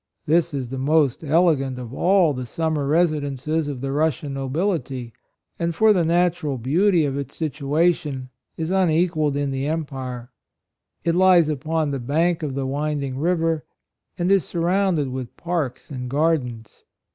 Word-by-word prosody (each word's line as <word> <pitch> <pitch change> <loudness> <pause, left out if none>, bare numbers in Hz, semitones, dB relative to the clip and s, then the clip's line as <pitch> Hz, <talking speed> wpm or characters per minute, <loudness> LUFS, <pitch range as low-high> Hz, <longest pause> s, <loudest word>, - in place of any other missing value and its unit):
This 165 +1 +2
is 135 -4 -4
the 135 - -4
most 145 0 +2
elegant 150 -4 +2
of 125 -1 -7
all 180 -1 +3
the 125 -2 -5
summer 155 +1 -1
resi 155 -1 +2
dences 145 +3 -2
of 140 -4 -5
the 135 0 -2
Russian 150 -1 0
nobility, 135 - -2 0.5
and 170 -1 -1
for 220 +2 +5
the 180 -4 +2
natural 170 -4 +1
beauty 165 - +2
of 135 -1 -2
its 140 -1 -5
situ 150 -2 -3
ation, 150 -6 +1 0.3
is 160 +2 -2
unequalled 165 -5 +2
in 145 -1 -1
the 135 +1 -2
empire. 130 -6 -4 0.7
It 170 - +1
lies 180 -3 +5
upon 155 +1 -1
the 135 - -2
bank 160 +7 +1
of 145 -4 -3
the 135 -1 -2
winding 140 -1 -2
river, 165 -1 +1 0.5
and 175 +2 +1
is 195 -4 +4
surrounded 175 -3 0
with 130 -2 -6
parks 165 -7 -3
and 125 -2 -5
gardens. 135 -7 -1
150 Hz, 155 wpm, -23 LUFS, 135-170 Hz, 0.7 s, for